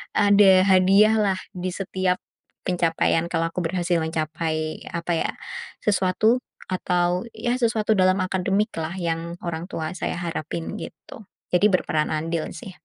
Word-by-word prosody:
ada 205 -1 +6 0.2
hadiahlah, 195 +1 +4 0.2
di 180 0 -3
setiap 185 -1 -1 0.5
pencapaian 170 -2 +1
kalau 165 -1 0
aku 180 - -3
berhasil 175 0 0
mencapai 155 0 -2
apa 170 0 -3
ya, - - -1 0.5
sesuatu 210 +4 +2 0.3
atau, 180 0 0
ya 240 0 -1
sesuatu 225 -2 +1
dalam 185 +1 +4
akademiklah, 190 -2 -1
yang 170 0 -2
orang 170 0 -3
tua 160 0 -3
saya - - -2
harapin, 165 +1 -4
gitu. 220 - -10 0.3
Jadi 180 +4 +5
berperan 155 -4 +1
andil 160 +1 -2
sih. 180 +3 -8
180 Hz, 125 wpm, -24 LUFS, 165-195 Hz, 0.5 s, ada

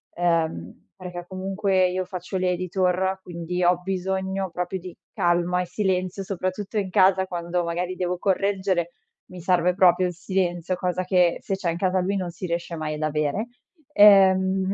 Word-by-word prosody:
ehm 165 - -1
perché 180 -2 -8
comunque 190 0 0
io 185 0 -2
faccio 185 +1 -5
l'editor, 185 +1 0
quindi 175 +1 -4
ho 175 0 +3
bisogno 190 +1 -2
proprio 180 +2 -3
di 180 0 -10 0.2
calma 175 +1 +1
e - - -3
silenzio, 185 0 -1
soprattutto 190 +2 -4
in 195 -2 -1
casa 190 +1 +4
quando 175 0 -2
magari 175 +2 -2
devo 180 0 -2
correggere, 190 -2 0 0.3
mi 180 -1 -11
serve 180 0 +2
proprio 185 0 +4
il 180 - -4
silenzio, 180 0 -1
cosa 180 0 -2
che 180 -2 +2
se 195 - -2
c'è 185 -3 -2
in 170 - -4
casa 185 +1 +1
lui 190 +2 -1
non 185 -2 -2
si 180 +2 -7
riesce 170 0 -3
mai 155 -1 -3
ad 150 - -6
avere. 155 +7 -1 0.5
Ehm 190 -2 +5
185 Hz, 165 wpm, -24 LUFS, 175-190 Hz, 0.5 s, Ehm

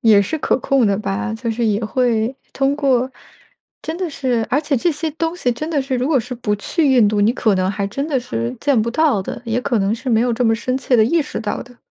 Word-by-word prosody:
也 215 -3 +6
是 315 +10 -3
可 - - +1
控 260 -2 +2
的 200 -1 +2
吧， 215 +2 -3
就 230 +1 -3
是 230 +1 -1
也 215 +1 0
会， 240 +1 0 0.2
通 275 +1 +1
过 265 -3 +1 0.7
真 320 - -4
的 365 -3 -2
是 250 -6 -1
而 270 - +2
且 295 -2 -1
这 340 +8 +1
些 310 +1 -3
东 330 +2 -2
西 250 -8 0
真 305 +7 -5
的 295 -4 0
是， 265 -1 -3
如 255 +4 -1
果 285 -5 +3
是 250 +2 -5
不 210 -3 -1
去 290 - +1
印 230 -4 +5
度， 205 0 +1
你 210 +3 +4
可 220 -5 +1
能 185 +1 +1
还 200 0 -2
真 275 +8 -3
的 275 -4 +1
是 115 - -4
见 280 -6 +2
不 235 +2 -1
到 290 -7 +2
的， - - -6
也 230 +2 -1
可 240 -3 0
能 195 +3 +1
是 255 +3 -6
没 225 -1 +3
有 245 -1 +1
这 245 +2 -1
么 225 0 +4
深 255 +3 -2
切 255 -2 +1
地 220 - +5
意 330 +7 +2
识 295 - -4
到 210 - -3
的。 245 0 -17
245 Hz, 285 characters per minute, -19 LUFS, 220-275 Hz, 0.7 s, 也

